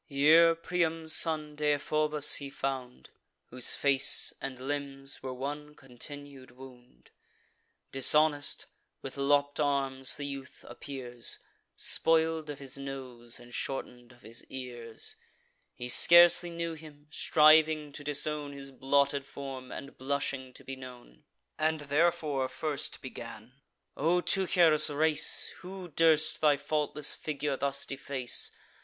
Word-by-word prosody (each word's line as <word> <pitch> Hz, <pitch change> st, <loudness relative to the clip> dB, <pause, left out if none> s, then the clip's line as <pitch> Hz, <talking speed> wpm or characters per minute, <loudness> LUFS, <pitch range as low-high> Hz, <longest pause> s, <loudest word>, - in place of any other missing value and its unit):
Here 160 Hz, +4 st, +5 dB
Priam's 165 Hz, -1 st, -1 dB
son, 155 Hz, -2 st, +1 dB
Deiphobus, 150 Hz, 0 st, +2 dB
he 140 Hz, -1 st, -6 dB
found, 135 Hz, -2 st, -5 dB, 0.4 s
Whose 125 Hz, 0 st, +1 dB
face 140 Hz, -1 st, +3 dB
and 130 Hz, -2 st, -6 dB
limbs 140 Hz, 0 st, -5 dB
were 130 Hz, -, -5 dB
one 145 Hz, +3 st, -6 dB
continued 140 Hz, +1 st, -11 dB
wound: 125 Hz, -, -16 dB, 0.8 s
Dishonest, 145 Hz, +2 st, +2 dB, 0.4 s
with 135 Hz, -, -7 dB
lopp'd 145 Hz, +1 st, +1 dB
arms, 135 Hz, -2 st, 0 dB
the 145 Hz, -, -6 dB
youth 140 Hz, -2 st, -8 dB
appears, 125 Hz, -2 st, -3 dB, 0.4 s
Spoil'd 160 Hz, -1 st, +1 dB
of 145 Hz, -, -5 dB
his 140 Hz, -1 st, -9 dB
nose, 130 Hz, -4 st, -7 dB
and 120 Hz, 0 st, -15 dB
shorten'd 125 Hz, -2 st, -5 dB
of 120 Hz, 0 st, -21 dB
his 115 Hz, +2 st, -6 dB
ears. 120 Hz, -3 st, -4 dB, 0.6 s
He 125 Hz, -, -6 dB
scarcely 175 Hz, +6 st, +8 dB
knew 170 Hz, -1 st, -4 dB
him, 150 Hz, -2 st, -13 dB
striving 155 Hz, 0 st, +4 dB
to 145 Hz, -, -10 dB
disown 145 Hz, 0 st, -2 dB
His 135 Hz, -1 st, -9 dB
blotted 140 Hz, +1 st, +1 dB
form, 135 Hz, -2 st, -8 dB
and 140 Hz, +1 st, -9 dB
blushing 135 Hz, -1 st, -3 dB
to -, -, -10 dB
be 135 Hz, -, -7 dB
known; 125 Hz, -, -13 dB, 0.3 s
And 155 Hz, 0 st, 0 dB
therefore 150 Hz, -2 st, 0 dB
first 150 Hz, -3 st, -3 dB
began: 120 Hz, 0 st, -10 dB, 0.3 s
"O 165 Hz, +5 st, +2 dB
Teucer's 170 Hz, -5 st, +3 dB
race, 150 Hz, +1 st, +2 dB
Who 185 Hz, 0 st, -9 dB
durst 160 Hz, 0 st, +2 dB
thy 150 Hz, -2 st, +4 dB
faultless 150 Hz, 0 st, 0 dB
figure 150 Hz, -2 st, -3 dB
thus 140 Hz, +1 st, -2 dB
deface? 135 Hz, -2 st, -2 dB
140 Hz, 125 wpm, -30 LUFS, 130-155 Hz, 0.8 s, scarcely